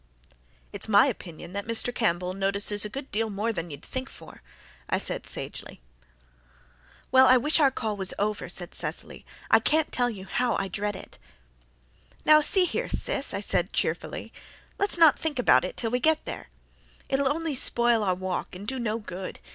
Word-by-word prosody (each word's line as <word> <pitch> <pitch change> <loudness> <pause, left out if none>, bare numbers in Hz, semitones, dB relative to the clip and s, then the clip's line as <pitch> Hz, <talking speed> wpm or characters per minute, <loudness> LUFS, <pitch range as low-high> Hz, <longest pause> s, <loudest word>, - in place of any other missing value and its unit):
"It's - - -3
my 205 +2 +6
opinion 175 - -6
that 200 +1 -5
Mr. 230 +1 0
Campbell 180 -6 0
notices 200 +1 +1
a 210 - -2
good 270 +5 -7
deal 225 +2 -1
more 215 +3 -2
than 170 -3 -5
you'd 145 0 -10
think 260 +1 -5
for," - - -14 0.5
I - - +2
said - - -3
sagely. - - -6 1.3
"Well, 260 0 +7
I 255 - +7
wish 300 +6 +2
our 285 -3 +5
call 220 -5 -3
was 190 -2 -2
over," 210 -3 -2
sighed 175 0 -5
Cecily. - - -7 0.2
"I - - +7
can't 310 0 +1
tell 245 -1 +1
you 195 -5 -8
how 245 +5 0
I 195 - -2
dread 205 +1 -3
it." 190 - -11 1.1
"Now, 305 0 +7
see 365 +5 +5
here, 465 +8 -2
Sis," - - 0
I - - -3
said - - 0
cheerfully, - - -3 0.5
"let's 400 -2 +2
not 325 -4 +6
think 310 -4 -3
about 250 - +4
it - - -5
till 225 -2 -2
we 250 - +1
get 315 +4 +2
there. - - -7 0.6
It'll 270 0 +1
only 325 0 -2
spoil 240 -3 +3
our 185 -2 +1
walk 185 -1 -4
and 195 +3 -8
do 260 +4 -3
no 225 -2 -1
good. 190 -4 -7
225 Hz, 185 wpm, -26 LUFS, 195-265 Hz, 1.3 s, Well